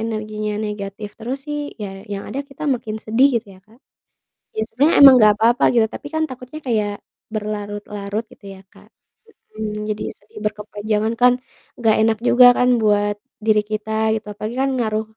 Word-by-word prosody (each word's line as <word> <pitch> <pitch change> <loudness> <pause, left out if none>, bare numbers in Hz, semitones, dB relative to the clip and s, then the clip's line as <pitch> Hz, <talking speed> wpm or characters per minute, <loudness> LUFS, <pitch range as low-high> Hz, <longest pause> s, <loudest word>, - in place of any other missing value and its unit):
energinya 215 -1 -3
negatif 210 -1 -5
terus 245 +4 -4
sih 295 0 -2 0.2
ya 205 - -3 0.2
yang 200 0 -4
ada 275 - -3
kita 280 +2 -13
makin 220 -3 -5
sedih 245 +6 +4
gitu 225 - -3
ya - - -20
Kak. 225 +3 -23 0.8
Ya, 220 - 0
sebenernya 285 +8 +3
emang 270 -2 +11
gak 215 -1 +7
apa-apa 230 +3 +3
gitu 230 -2 +5
tapi 290 - -7
kan 315 - +1
takutnya 255 +4 -9
kayak 215 -5 0 0.4
berlarut-larut 205 0 -4
gitu - - -19
ya - - -14
Kak. - - -19 0.7
Mhm, 215 -1 -3 0.2
jadi 215 - -3
sedih 210 +1 -14
berkepanjangan 210 +1 -2
kan 250 0 +6 0.5
gak 220 -2 +4
enak 220 0 +3
juga 250 0 +7
kan 250 - +3 0.2
buat 205 -1 +2 0.3
diri 215 -1 +4
kita 215 0 -3 0.2
gitu, 220 - -5
apalagi 215 +3 -6
kan 270 - +1
ngaruh, 220 -2 0
215 Hz, 170 wpm, -20 LUFS, 210-240 Hz, 0.8 s, emang